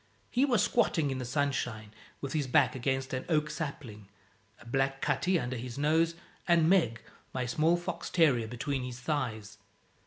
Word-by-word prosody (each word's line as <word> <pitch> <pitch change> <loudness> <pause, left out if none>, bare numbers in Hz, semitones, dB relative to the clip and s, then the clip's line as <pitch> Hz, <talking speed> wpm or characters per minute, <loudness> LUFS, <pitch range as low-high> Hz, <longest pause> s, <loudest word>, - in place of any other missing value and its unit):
He 255 +3 +3
was 240 -7 +3
squatting 160 - +2
in 130 - -3
the 125 - -4
sunshine, 125 -5 -2 0.3
with 140 -1 -4
his 150 -4 0
back 125 - +4
against 130 +1 -2
an 130 - -2
oak 150 -2 +1
sapling, 135 -9 -6 0.5
a - - -16
black 135 +2 0
cutty 180 +4 +1
under 125 -1 -3
his 120 +1 -6
nose, 160 +3 +2 0.3
and 170 -2 +4
Meg, 160 -12 +3 0.3
my 125 -1 -1
small 155 +8 +2
fox 175 +1 -5
terrier, 135 -10 +3
between 135 +4 -3
his 125 -1 -6
thighs. 110 -7 -3
135 Hz, 165 wpm, -30 LUFS, 125-160 Hz, 0.5 s, back